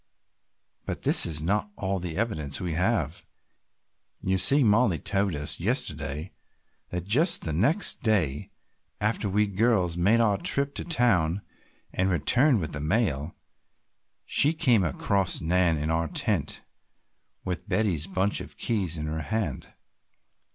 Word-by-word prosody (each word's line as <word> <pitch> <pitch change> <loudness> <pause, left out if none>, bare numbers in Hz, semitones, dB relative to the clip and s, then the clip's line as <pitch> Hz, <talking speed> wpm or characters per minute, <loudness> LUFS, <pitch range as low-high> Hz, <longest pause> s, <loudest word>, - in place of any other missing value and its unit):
"But - - -5
this - - +6
is 75 -2 -2
not 105 +4 -1
all 95 0 -3
the 85 -2 -6
evidence 80 -11 -3
we 90 -3 -3
have. 90 - -1 1.0
You 95 0 0
see 140 +8 +5
Mollie 105 -4 +3
told 95 +3 -1
us 75 0 -2
yesterday 80 - -2 0.6
that 90 0 -5
just 145 - +3
the 80 - -3
next 140 - +3
day 90 - 0 0.5
after 110 -1 -1
we 105 +2 +2
girls 100 -4 0
made 100 +7 +3
our 105 -4 +2
trip 140 -5 +1
to - - -4
town 100 - +1 0.5
and 95 +1 0
returned 120 - +3
with 80 - -5
the 75 - -5
mail, 80 - -1 0.9
she 150 +3 +4
came 125 - +2
across 95 +4 -1
Nan 85 0 +1
in 75 +2 -2
our 80 0 0
tent - - -2 0.8
with 90 -1 -5
Betty's 95 -7 0
bunch 95 +1 0
of - - -11
keys 95 -8 -1
in 75 - -4
her 80 +1 -4
hand. 110 +7 -4
95 Hz, 140 wpm, -26 LUFS, 80-110 Hz, 1.0 s, this